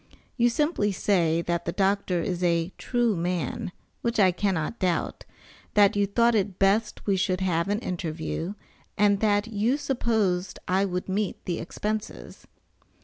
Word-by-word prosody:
You 240 0 +3
simply 240 -5 +1
say 170 -4 +1
that 170 0 -2
the 170 - -1
doctor 195 -2 +1
is 180 -1 -2
a 170 +1 +1
true 240 -4 +1
man, 175 -2 -2 0.3
which 235 -1 -1
I 190 -2 +6
cannot 185 +1 -1
doubt, 180 -3 -1 0.5
that 205 0 +5
you 205 0 +2
thought 235 +4 +3
it 200 -3 0
best 200 +3 +1
we 200 - +2
should 185 0 0
have 170 -2 +1
an 205 +1 +1
interview, 165 +1 -4 0.4
and 205 -1 +4
that 205 -1 +2
you 225 +5 +1
supposed 220 -10 0
I 190 +2 +2
would 180 -1 -3
meet 195 +1 -2
the 175 -2 -2
expenses. 210 +5 -5
195 Hz, 150 wpm, -26 LUFS, 180-210 Hz, 0.5 s, I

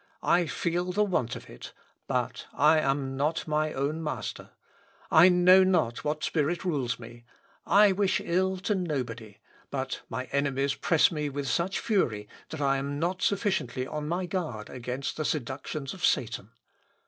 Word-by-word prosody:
I 175 -1 +3
feel 175 +3 -1
the 210 +3 +2
want 170 - -1
of - - -10
it; - - -11 0.3
but - - -2
I 155 +2 +5
am 135 -2 -1
not 150 +5 -1
my 155 0 0
own 145 +4 -2
master: 155 - -5 0.6
I 175 +4 +8
know 180 +1 +6
not 180 -11 +1
what 150 0 -2
spirit 165 +4 0
rules 135 -9 -1
me. 120 0 -12 0.4
I 205 0 +6
wish 190 -1 +1
ill 190 +2 0
to 200 +3 -1
nobody; 125 - -4 0.3
but - - -3
my 130 - -3
enemies 140 0 +1
press 165 0 +3
me 150 -3 -2
with 140 0 -4
such 170 +9 0
fury 115 - 0 0.2
that 160 - -6
I 135 -1 +2
am 140 +1 -3
not 175 +4 -1
sufficiently 190 - 0
on 150 +3 -5
my 175 +3 -1
guard 160 - -4
against 125 +2 -4
the 155 - -1
seductions 135 0 -3
of 190 - -11
Satan. 120 -6 0
150 Hz, 160 wpm, -28 LUFS, 135-180 Hz, 0.6 s, I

